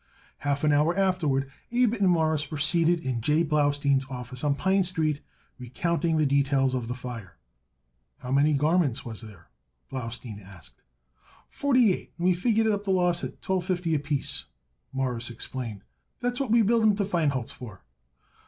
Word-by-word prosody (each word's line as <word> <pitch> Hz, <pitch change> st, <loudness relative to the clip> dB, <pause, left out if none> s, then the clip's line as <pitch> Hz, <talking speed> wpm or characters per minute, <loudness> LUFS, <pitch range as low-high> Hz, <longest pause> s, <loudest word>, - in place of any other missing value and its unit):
Half 145 Hz, 0 st, -1 dB
an 150 Hz, -, +4 dB
hour 150 Hz, +5 st, +2 dB
afterward 155 Hz, -9 st, +1 dB, 0.2 s
Abe 240 Hz, -2 st, +3 dB
and 200 Hz, -5 st, +2 dB
Morris 160 Hz, -4 st, +1 dB
were 155 Hz, -, -4 dB
seated 165 Hz, +3 st, +2 dB
in 130 Hz, -5 st, -2 dB
J. 150 Hz, +7 st, +2 dB
Blaustein's 145 Hz, -3 st, +1 dB
office 125 Hz, 0 st, -7 dB
on 145 Hz, -1 st, +2 dB
Pine 190 Hz, +5 st, +2 dB
Street, 160 Hz, -5 st, -1 dB, 0.4 s
recounting 165 Hz, +6 st, -1 dB
the 155 Hz, -, +3 dB
details 135 Hz, -1 st, +2 dB
of 125 Hz, -3 st, -2 dB
the 125 Hz, -, -3 dB
fire. 120 Hz, -, -8 dB, 0.8 s
"How 125 Hz, 0 st, -7 dB
many 145 Hz, +3 st, +4 dB
garments 150 Hz, -3 st, +1 dB
was 115 Hz, -2 st, -7 dB
there?" 100 Hz, -, -14 dB, 0.4 s
Blaustein 115 Hz, -4 st, -6 dB
asked. 95 Hz, -8 st, -15 dB, 0.7 s
"Forty 255 Hz, -8 st, +3 dB
eight, -, -, -8 dB
and 175 Hz, -, -2 dB
we 185 Hz, -, +5 dB
figured 220 Hz, +5 st, +1 dB
it 220 Hz, -, +3 dB
up 205 Hz, 0 st, -2 dB
the 200 Hz, -, -5 dB
loss 180 Hz, -2 st, +2 dB
at -, -, -7 dB
twelve 185 Hz, -2 st, -1 dB
fifty 180 Hz, -3 st, -1 dB
apiece," 145 Hz, -1 st, -2 dB, 0.5 s
Morris 125 Hz, -3 st, -2 dB
explained. 115 Hz, -3 st, -6 dB, 0.4 s
"That's 245 Hz, +1 st, -1 dB
what 275 Hz, -4 st, -1 dB
we 230 Hz, 0 st, +5 dB
billed 230 Hz, +2 st, +3 dB
'em 215 Hz, -2 st, +4 dB
to 200 Hz, -1 st, 0 dB
Feinholz 150 Hz, -, 0 dB
for." 110 Hz, -, -11 dB
150 Hz, 170 wpm, -27 LUFS, 130-180 Hz, 0.8 s, we